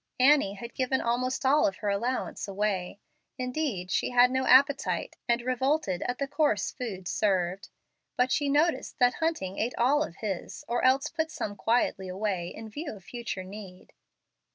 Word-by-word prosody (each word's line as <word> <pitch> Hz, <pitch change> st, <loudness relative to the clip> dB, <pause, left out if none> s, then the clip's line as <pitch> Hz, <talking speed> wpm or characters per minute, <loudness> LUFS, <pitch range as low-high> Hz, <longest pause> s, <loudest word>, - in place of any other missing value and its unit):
Annie 260 Hz, -7 st, +5 dB
had 235 Hz, +4 st, -8 dB
given 260 Hz, 0 st, 0 dB
almost 255 Hz, +3 st, -1 dB
all 285 Hz, +3 st, +5 dB
of 195 Hz, -, -2 dB
her 205 Hz, -, -3 dB
allowance 235 Hz, +5 st, -2 dB
away. 195 Hz, -1 st, -2 dB, 0.4 s
Indeed 250 Hz, -, -2 dB
she -, -, +1 dB
had 245 Hz, 0 st, +5 dB
no 260 Hz, 0 st, 0 dB
appetite, 275 Hz, +2 st, +4 dB
and 235 Hz, 0 st, +2 dB
revolted 255 Hz, -, 0 dB
at 245 Hz, -, -2 dB
the 280 Hz, -, -2 dB
coarse 285 Hz, -8 st, +1 dB
food 200 Hz, -8 st, -6 dB
served. 190 Hz, -2 st, 0 dB, 0.5 s
But 250 Hz, +1 st, +2 dB
she 290 Hz, -2 st, +1 dB
noticed 305 Hz, +4 st, +1 dB
that 245 Hz, 0 st, +4 dB
Hunting 315 Hz, -, -1 dB
ate 235 Hz, +3 st, -1 dB
all 275 Hz, +5 st, +3 dB
of 175 Hz, -, -3 dB
his, 195 Hz, -5 st, -5 dB
or 240 Hz, -, -1 dB
else 270 Hz, +3 st, +4 dB
put 320 Hz, -1 st, -2 dB
some 210 Hz, -9 st, -4 dB
quietly 210 Hz, -3 st, 0 dB
away, 185 Hz, -2 st, -2 dB
in 220 Hz, +5 st, -8 dB
view 290 Hz, +8 st, -6 dB
of 195 Hz, -, -14 dB
future 235 Hz, -4 st, -5 dB
need. 190 Hz, -1 st, -11 dB
240 Hz, 170 wpm, -28 LUFS, 200-265 Hz, 0.5 s, Annie